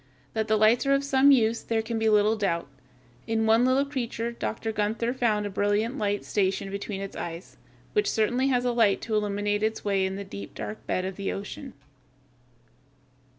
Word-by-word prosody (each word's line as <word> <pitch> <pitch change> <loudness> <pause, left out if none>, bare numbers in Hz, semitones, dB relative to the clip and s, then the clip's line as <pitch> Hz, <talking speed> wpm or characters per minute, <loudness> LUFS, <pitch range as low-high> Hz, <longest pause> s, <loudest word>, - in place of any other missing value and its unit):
That 220 -1 -1
the 215 -1 +3
lights 220 +5 +4
are 275 - +4
of 275 - 0
some 275 0 +4
use 230 -4 +4
there 225 -1 -1
can 225 0 -3
be 220 0 +2
little 210 +1 +4
doubt. 170 -7 -1 0.6
In 225 0 +1
one 225 +2 +4
little 260 +2 +3
creature 235 -4 -3
Dr. 225 -1 -3
Gunther 220 +3 -1
found 220 -5 +1
a - - -2
brilliant 205 +5 0
light 205 -1 -1
stationed 195 -1 0
between 200 0 -4
its 195 - -6
eyes, 170 +2 -7 0.4
which 420 -1 +2
certainly 245 +5 +1
was 250 -1 +1
a 245 - +2
light 225 -4 +3
to 225 - -4
illumine 205 -1 -1
its 210 +2 0
way 195 -2 +1
in 190 0 -1
the 200 - -5
deep, 100 - -9
dark 105 0 -7
bed 185 - -1
of 190 -1 -5
the 200 - -2
ocean. 235 +6 -7
220 Hz, 195 wpm, -27 LUFS, 200-235 Hz, 0.6 s, lights